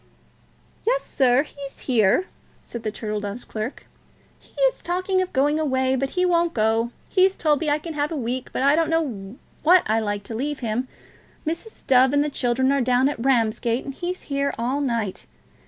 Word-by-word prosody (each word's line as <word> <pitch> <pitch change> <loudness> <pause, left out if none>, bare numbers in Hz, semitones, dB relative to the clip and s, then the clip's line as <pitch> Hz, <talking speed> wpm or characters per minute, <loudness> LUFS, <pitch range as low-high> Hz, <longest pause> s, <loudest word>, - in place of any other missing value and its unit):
"Yes, - - +1
sir; 260 0 +3
he's 280 -2 -10
here," 235 - +3 0.4
said 235 - -7
the 220 - -2
Turtle 215 0 -4
Dove's 205 +3 -5
clerk. 220 +4 -5 0.5
"He - - -16
is - - +2
talking 370 +2 0
of 370 - -3
going 290 +3 +2
away, 260 -3 +1
but 270 +1 -1
he 365 - +3
won't 340 -1 +2
go. 225 +1 +2 0.2
He's 380 0 +3
told 300 -3 +1
me 315 - 0
I 290 - +3
can 325 +2 -7
have 295 +1 -1
a - - -2
week, 255 -1 -3
but - - -2
I 280 +2 +5
don't 325 0 +1
know 250 -10 -2 0.3
that 355 +3 +6
I 220 +1 +2
like 205 -2 -2
to 225 - -7
leave 280 +5 -3
him. 235 +2 -2 0.6
Mrs. 335 +8 -5
Dove 260 +1 +5
and 285 0 +4
the 300 - -2
children 260 +1 +1
are 280 -1 +2
down 250 +2 +3
at 245 -5 -5
Ramsgate, 235 -1 +1
and 275 - -5
he's 360 +5 -5
here 280 0 -1
all 250 +5 -1
night. 230 -8 -2
270 Hz, 195 wpm, -23 LUFS, 235-310 Hz, 0.6 s, that